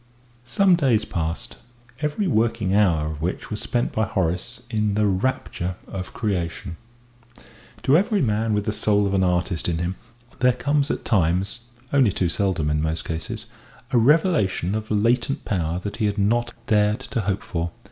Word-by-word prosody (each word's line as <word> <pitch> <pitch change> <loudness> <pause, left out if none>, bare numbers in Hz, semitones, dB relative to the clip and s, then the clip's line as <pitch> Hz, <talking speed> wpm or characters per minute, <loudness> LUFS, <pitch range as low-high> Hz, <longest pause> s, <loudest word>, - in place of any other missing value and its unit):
Some 190 +7 +4
days 125 -9 +2
passed, 80 -3 -4 0.4
every 150 +7 -1
working 115 - +1
hour 85 -7 +3
of 75 -1 -7
which 90 +6 -3
was 105 - -3
spent 120 -1 -1
by 110 - +1
Horace 95 +3 -2
in 105 -2 +1
the 105 0 +2
rapture 95 -3 -1
of 95 -1 -6
creation. 90 -4 -3 1.1
To 135 - +4
every 205 +4 +3
man 110 - +1
with 105 -1 -1
the 105 - -1
soul 105 -1 +2
of 100 - -1
an 95 -1 +3
artist 90 -1 0
in 85 - 0
him 85 +3 -2 0.4
there 125 0 +4
comes 140 +4 0
at - - -3
times 95 +3 +1 0.3
only 130 -7 +5
too 90 -1 0
seldom 85 -5 0
in 75 0 +1
most 80 +1 -2
cases 80 0 -5 0.5
a 125 - +4
revelation 125 - +3
of 110 0 -3
latent 120 +5 +1
power 85 -4 -1
that 100 - -4
he 110 -2 +1
had 100 +1 -2
not 120 +4 +1
dared 105 0 +2
to 115 - -3
hope 100 0 -1
for. 85 -1 -2
105 Hz, 170 wpm, -23 LUFS, 90-120 Hz, 1.1 s, only